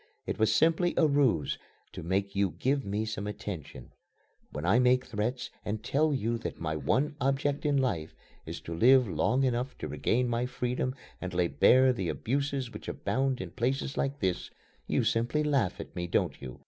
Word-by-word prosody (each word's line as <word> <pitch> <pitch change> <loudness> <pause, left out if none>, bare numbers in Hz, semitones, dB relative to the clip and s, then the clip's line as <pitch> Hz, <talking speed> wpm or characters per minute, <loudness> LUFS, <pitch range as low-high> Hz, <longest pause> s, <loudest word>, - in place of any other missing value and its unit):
It - - -3
was 110 0 +4
simply 165 +8 +3
a 165 - +5
ruse 140 - +2 0.3
to - - -7
make 95 +4 -1
you 100 -2 +1
give 135 +1 +1
me 105 +1 -2
some 110 -2 -4
attention. 90 -11 -7 0.6
When 75 +4 -5
I 105 +7 +4
make 125 0 +4
threats 115 +4 -3
and 105 +1 -3
tell 150 +5 +2
you 120 -4 -1
that - - -5
my 80 -1 -2
one 130 - 0
object 140 +2 0
in 145 -1 +2
life 95 - -1 0.3
is - - -7
to 85 - -6
live 125 +7 +5
long 95 - +1
enough 125 0 -1
to - - -5
regain 125 +2 0
my 120 +1 0
freedom 125 +1 -2 0.3
and 95 -1 -5
lay 90 -1 +2
bare 130 +1 +5
the 95 -8 -2
abuses 135 - -2
which - - -9
abound 135 0 -1
in - - -6
places 130 +3 -1
like 140 +1 -2
this, 95 -2 -1 0.4
you - - +1
simply 120 +7 +1
laugh 140 -11 +1
at - - -8
me, 85 0 -3
don't 85 - 0
you? 65 -3 -8
120 Hz, 185 wpm, -29 LUFS, 100-135 Hz, 0.6 s, a